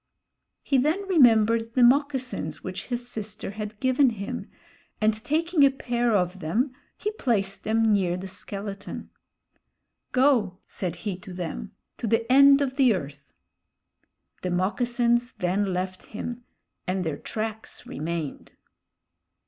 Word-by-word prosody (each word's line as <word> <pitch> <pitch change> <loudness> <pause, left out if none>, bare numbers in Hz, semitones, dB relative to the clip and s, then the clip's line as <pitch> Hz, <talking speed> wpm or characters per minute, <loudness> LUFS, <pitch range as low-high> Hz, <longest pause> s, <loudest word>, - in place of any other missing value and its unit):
He 270 - +2
then 325 +9 0
remembered 230 - +4
the 255 - +5
moccasins 265 0 +1
which - - -5
his 245 -1 -3
sister 215 -4 -5
had 210 0 -6
given 260 +2 +4
him, 205 -3 -5 0.5
and 215 0 +1
taking 320 +2 +2
a 275 - +8
pair 240 -3 0
of 180 -1 0
them, 225 - 0 0.2
he 420 - -2
placed 200 - -1
them 225 0 +3
near 180 -3 +1
the 190 +1 -6
skeleton. 200 +1 -6 1.0
"Go," 250 -8 +3
said 180 -3 -4
he 195 -4 -2
to 190 +1 -11
them, 165 - -5 0.3
"to 230 - -2
the 225 +1 +2
end 275 +1 +7
of 265 -1 -1
the 255 -6 +5
earth." 140 -4 -8 1.1
The 180 - -2
moccasins 240 +6 +1
then 195 0 0
left 185 +1 -4
him, 240 +2 -6 0.4
and 185 0 0
their 160 -4 -2
tracks 220 +4 -5
remained. 160 0 -5
220 Hz, 130 wpm, -26 LUFS, 190-255 Hz, 1.1 s, a